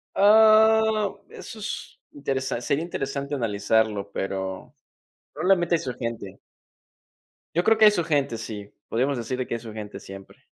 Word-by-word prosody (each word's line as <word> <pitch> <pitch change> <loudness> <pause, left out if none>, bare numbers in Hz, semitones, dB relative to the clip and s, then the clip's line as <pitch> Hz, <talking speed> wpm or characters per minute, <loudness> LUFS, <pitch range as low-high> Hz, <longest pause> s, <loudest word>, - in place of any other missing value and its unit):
Oh, 220 0 +5
eso 225 - -10
s 220 - -6 0.2
interesa 135 -3 -3
sería 140 +6 -1
interesante 140 -3 -4
analizarlo, 105 -3 0
pero 95 -1 -4 0.6
probablemente 175 -2 +2
hay 165 - +2
su 125 - -4
gente. 115 -5 -6 1.2
Yo 175 - +2
creo 225 +2 +5
que 220 - +6
hay 210 - +9
su 175 -5 -1
gente, 140 -7 0
sí. 105 -2 -7 0.2
Podríamos 135 +4 0
decir 125 +2 -4
de 130 - -2
que - - -3
hay 115 - -4
su 115 -1 -9
gente 105 -2 -8
siempre. 95 0 -12
135 Hz, 155 wpm, -25 LUFS, 110-180 Hz, 1.2 s, hay